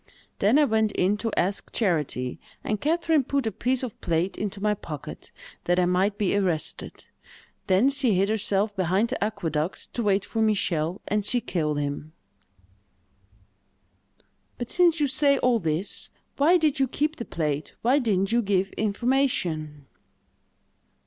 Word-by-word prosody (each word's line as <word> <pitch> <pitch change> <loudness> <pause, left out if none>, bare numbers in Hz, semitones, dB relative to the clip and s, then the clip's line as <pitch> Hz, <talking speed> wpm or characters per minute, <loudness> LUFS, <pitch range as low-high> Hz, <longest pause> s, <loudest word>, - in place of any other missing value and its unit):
Then 210 +8 +4
I 300 - +5
went 220 -3 +1
in 190 +3 +2
to 225 +1 -3
ask 195 +3 -1
charity, 150 - -1 0.2
and 210 -1 -2
Catherine 320 -1 +2
put 275 0 -1
a 220 - 0
piece 255 +3 -1
of 245 -5 -6
plate 170 +2 0
into 205 -1 -4
my 210 +1 +1
pocket, 155 -7 -8 0.3
that 175 0 +2
I 180 - +3
might 190 +3 +1
be 200 -2 +1
arrested; 180 -6 -2 0.6
then 195 +6 +4
she 270 -7 +1
hid 195 +2 +2
herself 205 -1 0
behind 190 +5 +1
the - - -2
aqueduct 165 -6 -3
to 240 - -2
wait 200 -2 +1
for 225 - -2
Michel, 185 -5 0
and 210 0 0
she 245 +4 +1
killed 155 -9 -2
him." 145 +2 -4 2.4
"But, 240 - -5
since 345 -2 +4
you 295 - +3
say 280 +1 +3
all 250 -3 +2
this, 165 +2 -1 0.3
why 325 +6 +5
did 310 -5 +1
you 270 - +3
keep 305 +5 -1
the 235 - -4
plate—why 160 - -1
didn't 195 -6 0
you 240 +1 +3
give 195 -2 0
information?" 200 - -1
205 Hz, 150 wpm, -25 LUFS, 180-250 Hz, 2.4 s, I